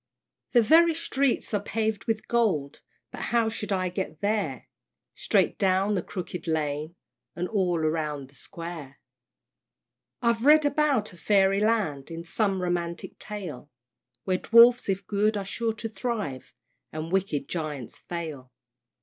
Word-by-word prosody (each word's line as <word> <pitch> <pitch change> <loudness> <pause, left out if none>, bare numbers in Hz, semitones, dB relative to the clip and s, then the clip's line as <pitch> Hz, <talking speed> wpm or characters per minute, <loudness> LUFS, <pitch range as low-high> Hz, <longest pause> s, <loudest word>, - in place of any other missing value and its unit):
The 240 -2 +6
very 330 +6 +5
streets 275 -7 0
are 205 - +1
paved 220 -1 -2
with 220 -1 -2
gold; 190 -13 0 0.3
But - - -7
how 230 -2 +1
shall 215 -1 -5
I 185 -1 -1
get 175 -4 -4
there? 200 - -1 0.5
"Straight - - +1
down 195 +1 +2
the 190 - 0
Crooked 180 0 -6
Lane, 155 0 -2 0.4
And 180 +1 -2
all 185 -5 +1
round 155 -3 -1
the - - -21
Square." 165 -3 -9 1.2
I've 235 -2 +1
read 300 +2 +6
about 285 -9 +1
a - - -14
Fairy 195 +2 +3
Land, 205 -11 0
In 165 0 -6
some 190 0 0
romantic 170 -1 -3
tale, 175 -10 -7 0.5
Where 185 -1 0
Dwarfs 235 0 +6
if 195 0 -1
good 210 +2 +1
are 200 - -3
sure 225 +3 -1
to 225 +1 -5
thrive 215 - -4 0.4
And 155 +2 -5
wicked 185 -7 0
Giants 150 -7 -5
fail. 155 -7 -6
190 Hz, 140 wpm, -27 LUFS, 160-220 Hz, 1.2 s, The